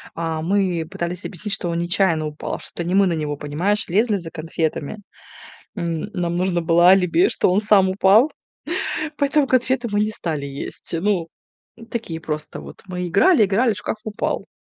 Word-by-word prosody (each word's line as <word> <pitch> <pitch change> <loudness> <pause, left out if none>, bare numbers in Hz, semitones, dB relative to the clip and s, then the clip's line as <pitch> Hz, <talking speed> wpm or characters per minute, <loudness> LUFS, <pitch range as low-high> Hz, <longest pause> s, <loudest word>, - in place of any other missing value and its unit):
А, 165 -1 -2
мы 180 -2 0
пытались 175 +2 -4
объяснить, 200 +2 -4
что 180 -3 -2
он 170 - -1
нечаянно 170 -2 +1
упал, 150 0 -4
что - - -12
это 175 - -4
не 175 +2 -1
мы 200 0 +5
на 180 - +1
него, 150 -2 -2
понимаешь, 175 +10 -1
лезли 210 +4 +2
за 170 -4 -5
конфетами. 160 +2 -3 0.8
М, 170 -1 -3
нам 175 -3 -1
нужно 180 -1 0
было 170 +2 +5
алиби, 190 - +4
что 185 - +1
он 195 +3 +3
сам 200 -3 +4
упал, 200 +9 +4 0.9
поэтому 285 0 +2
конфеты 255 -1 +1
мы 205 - 0
не 215 +1 +1
стали 155 -8 -3
есть. 140 +4 -7
Ну, 190 -3 +1 0.6
такие 180 -9 -4
просто 150 -1 -5
вот - - -12
мы 180 -1 -4
играли, 225 - +5
играли, 220 +4 +2
шкаф 205 - -4
упал. 215 -2 -3
180 Hz, 170 wpm, -21 LUFS, 165-210 Hz, 0.9 s, мы